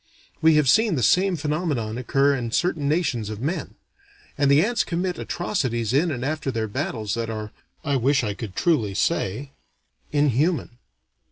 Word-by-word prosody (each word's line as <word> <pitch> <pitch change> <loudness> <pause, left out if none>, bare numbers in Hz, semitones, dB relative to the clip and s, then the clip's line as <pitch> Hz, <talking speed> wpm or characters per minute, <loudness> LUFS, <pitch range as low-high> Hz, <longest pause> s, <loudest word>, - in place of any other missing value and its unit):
We 160 -1 +5
have 150 -2 +3
seen 215 - +4
the 125 - -1
same 185 - +3
phenomenon 150 -7 -2
occur 135 +3 +2
in 120 -3 -3
certain 155 -1 0
nations 130 - 0
of 105 -1 -6
men. 155 +9 -3 0.6
And 140 -1 +2
the 145 +6 +5
ants 240 +1 +1
commit 180 +1 -2
atrocities 125 - -2
in 155 +6 +3
and 130 -4 -3
after 155 -1 -2
their 115 -3 -2
battles 105 0 -3
that 115 -1 -2
are 110 -1 -5 0.3
I 140 -3 +1
wish 135 +2 +2
I 105 -2 -1
could 100 -2 -8
truly 115 - +1
say 120 +12 -1 0.6
inhuman. 145 -2 +1
140 Hz, 165 wpm, -24 LUFS, 115-160 Hz, 0.6 s, We